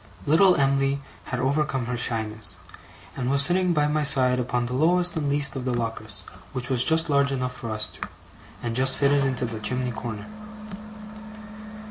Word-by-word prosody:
Little 175 +5 +5
Em'ly 135 0 +1 0.3
had 125 - -4
overcome 135 -1 0
her 125 +1 -3
shyness, 110 -2 -3 0.6
and 125 -1 -3
was 140 +1 +4
sitting 180 +2 +3
by 150 -3 +2
my 150 +1 0
side 130 -3 +5
upon 125 0 -1
the 125 - -5
lowest 175 +6 +2
and 150 -3 -1
least 140 -1 +1
of 130 - -4
the 125 -1 -1
lockers, 110 -4 -3 0.3
which 125 0 -4
was 125 -1 +5
just 160 +4 +2
large 140 -2 +2
enough 125 -1 -2
for 120 -2 -7
us 110 -1 -1
two, - - -9 0.6
and 115 -1 -3
just 130 +1 +2
fitted 140 0 +2
into 130 -2 -1
the 115 -2 -6
chimney 125 +2 -2
corner. 110 -2 -6
130 Hz, 175 wpm, -24 LUFS, 120-145 Hz, 0.6 s, Little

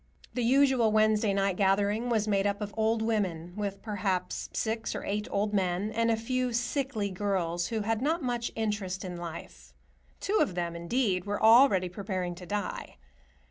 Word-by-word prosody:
The 250 - -1
usual 260 -2 +4
Wednesday 215 -1 +3
night 195 -1 +1
gathering 205 +4 +2
was 220 -2 +1
made 200 -1 +2
up 200 0 -1
of 210 -1 -5
old 220 0 +1
women, 185 -7 -1
with 200 -1 -4
perhaps 190 -4 -2
six 225 0 -2
or - - -4
eight 210 +1 -2
old 205 +1 -1
men, 190 +1 0
and 230 +1 +1
a 225 - +3
few 250 +2 -1
sickly 240 -3 -1
girls 180 -3 -1
who 225 -2 -2
had 225 +2 -1
not 315 +3 0
much 240 -2 -2
interest 205 -4 -2
in 180 -1 -5
life; 170 -1 -9 0.4
two 425 +2 +1
of 185 - +1
them, 170 -1 -2
indeed, 185 +1 0
were 205 0 -2
already 220 -5 +6
preparing 185 -1 -3
to 180 0 -11
die. 205 - -4
210 Hz, 175 wpm, -29 LUFS, 185-225 Hz, 0.4 s, already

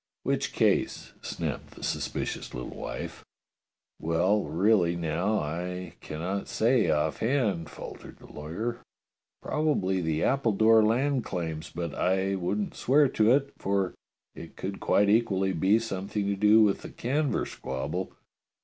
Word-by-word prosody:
"Which - - 0
case? - - +1
" - - -31
snapped - - -5
the - - -11
suspicious - - -3
little 60 - -6
wife. - - -6 0.8
"Well, 90 +6 +1
really, 90 -1 +3
now, 85 +6 0
I 90 +3 -4
cannot 90 +6 -4
say 115 -4 +2
off 75 0 +1
hand," 110 - 0
faltered - - -10
the - - -16
lawyer. 105 +11 -5 0.6
"Probably 100 -12 +1
the 80 -1 0
Appledore 115 -4 +4
land 125 +4 +2
claims, 80 -4 -4
but 85 -2 -4
I 95 +1 +1
wouldn't 95 +2 -2
swear 140 +2 +3
to 110 -1 +3
it, 140 +1 +2
for 95 -2 0 0.4
it 80 - -10
could 95 +1 -5
quite 100 - +3
equally 100 -3 +2
be 95 +6 +3
something 105 -2 -3
to 100 0 0
do 105 +2 +6
with 100 -2 +2
the - - -8
Canver 140 +4 -1
squabble. 65 0 -4
100 Hz, 140 wpm, -28 LUFS, 85-110 Hz, 0.8 s, do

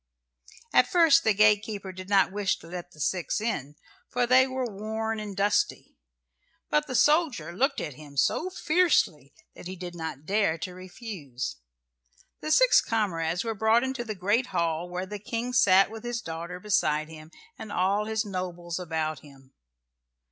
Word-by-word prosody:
At - - +5
first 330 -2 +5
the 220 - +4
gatekeeper 205 -1 +2
did 185 +1 -10
not 195 -2 +4
wish 200 0 0
to - - -15
let 175 0 -7
the 155 - -19
six 180 +7 -1
in, 150 - -3 0.3
for 245 0 +1
they 255 +2 +5
were 260 -1 -2
worn 220 +1 -3
and 210 -2 -6
dusty, 205 +1 0 0.8
but 300 0 +2
the 255 - -4
soldier 295 - +2
looked 270 - +1
at 150 - -4
him 145 0 -13
so 330 - +1
fiercely 310 - +1 0.2
that - - -10
he 185 - -6
did 180 -1 -7
not 160 -4 -6
dare 200 -3 +1
to 180 +3 -6
refuse. 180 - -7 0.8
The 310 - -5
six - - +6
comrades 175 -6 -1
were 225 -1 -2
brought 220 +3 +3
into 265 -2 -3
the 220 -2 -5
great 205 +7 +1
hall 170 -5 -1
where 180 +1 -4
the 205 +2 -7
King 235 +4 -4
sat 195 -5 +5
with 225 -1 -8
his 240 -1 -3
daughter 170 -2 -6
beside 155 -7 +1
him 155 -1 -12 0.3
and 215 - -8
all 200 +3 +1
his 220 0 -1
nobles 180 -3 -4
about 160 -4 -2
him. 135 -2 -18
200 Hz, 170 wpm, -27 LUFS, 170-230 Hz, 0.8 s, six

